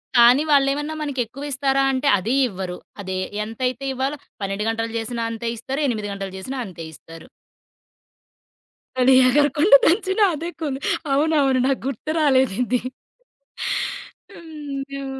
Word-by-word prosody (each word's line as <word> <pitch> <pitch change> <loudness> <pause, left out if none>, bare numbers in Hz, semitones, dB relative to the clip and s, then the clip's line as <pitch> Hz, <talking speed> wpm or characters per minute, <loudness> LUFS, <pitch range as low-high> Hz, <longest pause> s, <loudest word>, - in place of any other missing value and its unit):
కానీ, 245 +4 +7
వాళ్ళెమన్నా 285 +2 +2
మనకి 285 -3 -3
ఎక్కువి 275 +6 -8
ఇస్తారా 275 0 +1
అంటే, 265 +1 -1
అదీ 225 +8 -1
ఇవ్వరు. 185 -2 -5 0.2
అదే 190 -1 -4 0.3
ఎంతైతే 250 +4 -3
ఇవ్వాలో 265 +3 -2 0.2
12 195 +1 -2
గంటలు 225 0 -2
చేసినా 230 +1 -3
అంతే 230 +1 -4
ఇస్తారు. 270 +6 -4
8 215 -3 -3
గంటలు 195 -1 -6
చేసినా 260 +8 -5
అంతే 175 -4 -9
ఇస్తారు. 165 0 -13 1.7
అది 260 +1 +6
ఎగరకుండా 295 - +5
దంచిన 385 +3 +2
అదే 330 +3 -5
కూలి 280 -4 -2 0.3
అవునవును. 280 -3 +2
నాకు 270 -1 0
గుర్తు 275 +3 -4
రాలేదు 265 -7 +3
ఇది. 250 0 0 1.6
అయ్యో! 275 -4 -7
265 Hz, 125 wpm, -22 LUFS, 225-285 Hz, 1.7 s, కానీ